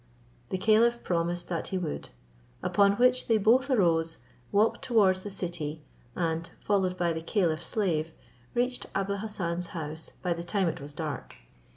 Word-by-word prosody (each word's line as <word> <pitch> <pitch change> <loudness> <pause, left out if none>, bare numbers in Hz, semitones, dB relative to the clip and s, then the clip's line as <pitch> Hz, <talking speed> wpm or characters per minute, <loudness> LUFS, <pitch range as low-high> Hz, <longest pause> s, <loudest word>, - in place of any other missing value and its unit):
The - - -1
caliph 225 +4 +3
promised 175 0 -1
that 170 -2 -2
he 190 - -2
would; 170 -5 -4 0.5
upon 200 -1 +4
which 250 +3 +3
they 225 - +4
both 245 +6 +4
arose, 165 -8 +2 0.3
walked 210 +3 +3
towards 200 -6 +4
the 205 - -5
city, 170 -5 -4 0.3
and, 165 -1 -1
followed 190 -3 +1
by 175 -2 +1
the 160 - -4
caliph's 170 -3 0
slave, 165 -7 0 0.4
reached 250 +1 +1
Abou 195 +1 0
Hassan's 180 -5 -3
house 155 0 -6
by 180 -2 +1
the 170 0 -6
time 190 +1 0
it 160 - -3
was 145 +1 -8
dark. 155 -2 -5
180 Hz, 160 wpm, -29 LUFS, 165-210 Hz, 0.5 s, upon